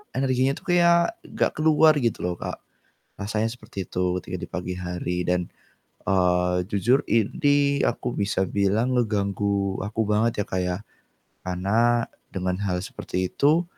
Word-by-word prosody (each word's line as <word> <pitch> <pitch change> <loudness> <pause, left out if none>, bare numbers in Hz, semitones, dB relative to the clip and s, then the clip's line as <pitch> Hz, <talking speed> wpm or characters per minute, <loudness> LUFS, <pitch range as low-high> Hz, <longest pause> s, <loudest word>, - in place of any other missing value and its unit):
energinya 130 0 +2
tuh 195 - -13
kayak 170 -1 +4
nggak - - 0
keluar 155 0 +6
gitu 115 -4 0
loh, 90 0 -1
Kak. - - -5 0.6
Rasanya 105 +2 -1
seperti 110 -5 -7
itu 90 0 -1
ketika 90 - -6
di - - -6
pagi 90 0 -4
hari 90 0 -3
dan, 90 -1 0 0.6
eee, 90 -1 +2
jujur 115 +7 +2
ini 140 - +2
aku 120 +1 -2
bisa 100 -1 +1
bilang 100 +5 +1
ngeganggu 100 -3 0
aku 110 +2 -2
banget 110 0 +2
ya, - - -16
Kak, 95 - -1
ya. 90 0 -1 0.7
Karena 110 +6 +2 0.3
dengan 90 -1 -1
hal 90 -2 -1
seperti 95 -1 -3
itu, 155 +4 +3
100 Hz, 145 wpm, -25 LUFS, 90-125 Hz, 0.7 s, keluar